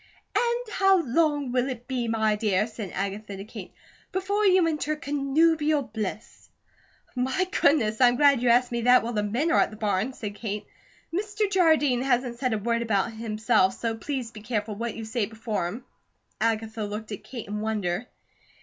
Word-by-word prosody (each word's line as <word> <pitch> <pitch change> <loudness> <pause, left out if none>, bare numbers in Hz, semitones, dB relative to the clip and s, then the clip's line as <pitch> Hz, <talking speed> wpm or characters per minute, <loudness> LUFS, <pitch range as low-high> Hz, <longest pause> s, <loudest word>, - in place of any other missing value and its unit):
"And 475 -1 0
how 385 -2 +4
long 290 0 +1
will 250 +1 +1
it 245 -1 -7
be, 250 -3 -2
my 220 -1 +1
dear," 210 -2 +1
said 220 -3 -7
Agatha 200 +1 -4
to 195 - -7
Kate, 215 - -9 0.4
"before 400 +2 +1
you 370 -3 +5
enter 305 -1 -1
connubial 300 +1 +2
bliss?" 215 -2 -6 0.7
"My 265 +10 0
goodness! 225 -6 +3
I'm 245 -1 +6
glad 280 -2 +5
you 245 - +2
asked 245 +1 +4
me 235 0 -1
that 250 +1 +5
while 235 +1 -3
the 210 - +1
men 240 +11 0
are - - +4
at - - +3
the 215 - -10
barn," 210 +3 0
said 210 -4 -6
Kate. 210 -1 -5 0.5
"Mr. 420 +3 -1
Jardine 315 -9 +3
hasn't 250 -2 0
said 255 -2 0
a - - +1
word 230 +2 0
about 220 -2 +1
it 225 - -11
himself, 220 -3 +1
so 230 -1 -1
please 250 0 -4
be 215 - -11
careful 215 -1 -2
what 230 +2 -4
you 225 - -6
say 220 -1 -1
before 220 -5 -3
him." 220 +8 -7 0.6
Agatha 225 0 -1
looked 210 +2 -5
at 205 - -6
Kate 240 -4 -8
in 210 +1 -4
wonder. 215 -1 -2
235 Hz, 185 wpm, -26 LUFS, 215-285 Hz, 0.7 s, I'm